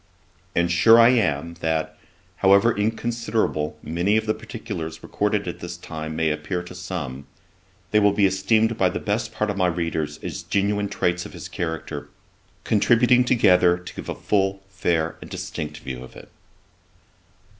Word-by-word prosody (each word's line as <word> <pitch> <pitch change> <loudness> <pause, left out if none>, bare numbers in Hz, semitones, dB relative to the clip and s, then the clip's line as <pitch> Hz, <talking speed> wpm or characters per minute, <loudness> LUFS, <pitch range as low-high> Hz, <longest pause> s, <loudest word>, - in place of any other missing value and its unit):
And 85 0 +2
sure 115 +7 +7
I 115 +1 +8
am, 85 - +1
that, 80 -2 -1 0.4
however 100 +4 +5
inconsiderable 110 -7 -1
many 90 +6 +1
of 110 - 0
the 110 - +1
particulars 85 -11 -7
recorded - - -1
at - - -5
this 85 0 -6
time 80 -2 -6
may 80 -1 +1
appear 75 +4 -3
to 90 - -10
some, 85 -7 -6 0.6
they 105 - +5
will 105 -1 +4
be 100 0 +3
esteemed 110 +4 +2
by 95 - +4
the - - -3
best 110 +2 -2
part 105 -1 -1
of 100 - -6
my 90 -2 +3
readers 85 -3 -2
as - - -4
genuine 100 0 0
traits 90 -3 -1
of - - -15
his - - -8
character, 80 -2 -5 0.5
contributing 120 +4 +4
together 90 -8 +4
to 90 0 -10
give - - -8
a - - -3
full, 95 -1 0
fair, 85 -4 -1
and - - -10
distinct 90 -5 -5
view 65 -3 -7
of 65 - -13
it. - - -12
90 Hz, 165 wpm, -23 LUFS, 80-105 Hz, 0.6 s, I